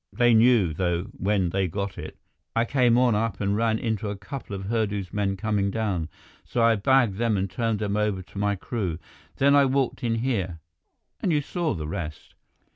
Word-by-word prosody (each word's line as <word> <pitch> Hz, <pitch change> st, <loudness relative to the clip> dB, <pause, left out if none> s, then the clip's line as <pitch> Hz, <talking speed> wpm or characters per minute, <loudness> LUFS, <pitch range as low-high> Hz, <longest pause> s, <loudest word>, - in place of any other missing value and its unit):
They 120 Hz, -1 st, +3 dB
knew, 110 Hz, -7 st, +5 dB
though, 85 Hz, +1 st, 0 dB
when 95 Hz, -3 st, 0 dB
they 95 Hz, 0 st, +1 dB
got 100 Hz, +3 st, -4 dB
it. -, -, -8 dB, 0.4 s
I 115 Hz, -, +3 dB
came 120 Hz, -2 st, +3 dB
on 125 Hz, -2 st, +4 dB
up 105 Hz, -2 st, -1 dB
and 100 Hz, 0 st, 0 dB
ran 110 Hz, 0 st, +1 dB
into 110 Hz, -2 st, -2 dB
a 100 Hz, -, -3 dB
couple 105 Hz, 0 st, -7 dB
of 95 Hz, -, -5 dB
Hurdu's 105 Hz, -3 st, -2 dB
men 100 Hz, -1 st, 0 dB
coming 105 Hz, -1 st, 0 dB
down. 100 Hz, -6 st, -2 dB, 0.3 s
So 120 Hz, -, -1 dB
I 115 Hz, 0 st, +5 dB
bagged 115 Hz, -1 st, +3 dB
them 115 Hz, -3 st, +2 dB
and 95 Hz, +1 st, 0 dB
turned 115 Hz, +2 st, -1 dB
them 105 Hz, -1 st, -2 dB
over 105 Hz, -3 st, 0 dB
to 95 Hz, -, -14 dB
my 100 Hz, 0 st, +1 dB
crew. 95 Hz, -4 st, -3 dB, 0.4 s
Then 140 Hz, +1 st, +4 dB
I 140 Hz, -1 st, +6 dB
walked 135 Hz, -1 st, 0 dB
in 115 Hz, -1 st, +1 dB
here, 110 Hz, -8 st, -1 dB, 0.6 s
and 180 Hz, -, 0 dB
you 150 Hz, -, +3 dB
saw 160 Hz, -, -2 dB
the 75 Hz, -3 st, -5 dB
rest." 80 Hz, -1 st, -6 dB
105 Hz, 200 wpm, -25 LUFS, 95-120 Hz, 0.6 s, I